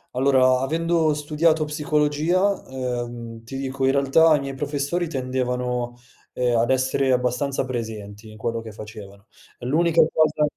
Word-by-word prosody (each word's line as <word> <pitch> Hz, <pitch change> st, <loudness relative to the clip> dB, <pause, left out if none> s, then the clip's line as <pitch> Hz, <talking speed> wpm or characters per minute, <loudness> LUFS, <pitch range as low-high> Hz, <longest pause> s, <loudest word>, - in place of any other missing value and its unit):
Allora, 130 Hz, -1 st, +4 dB
avendo 160 Hz, +3 st, +1 dB
studiato 155 Hz, +2 st, +1 dB
psicologia, 150 Hz, +5 st, +1 dB
ehm, 120 Hz, -3 st, -5 dB
ti 135 Hz, -, -8 dB
dico 135 Hz, 0 st, -2 dB
in 135 Hz, -, +4 dB
realtà 140 Hz, +4 st, +5 dB
i 145 Hz, -, -1 dB
miei 135 Hz, -1 st, -5 dB
professori 145 Hz, +5 st, -2 dB
tendevano, 125 Hz, -3 st, -2 dB, 0.4 s
ehm, 125 Hz, -1 st, +1 dB
ad 115 Hz, +2 st, +1 dB
essere 130 Hz, 0 st, +2 dB
abbastanza 125 Hz, +3 st, 0 dB
presenti 110 Hz, -4 st, -6 dB
in 110 Hz, -, -12 dB
quello 115 Hz, +1 st, -2 dB
che 115 Hz, -1 st, -9 dB
facevano 105 Hz, -1 st, -11 dB, 0.3 s
l'unica 165 Hz, +6 st, +3 dB
cosa 155 Hz, -1 st, +2 dB
130 Hz, 135 wpm, -23 LUFS, 120-150 Hz, 0.4 s, realtà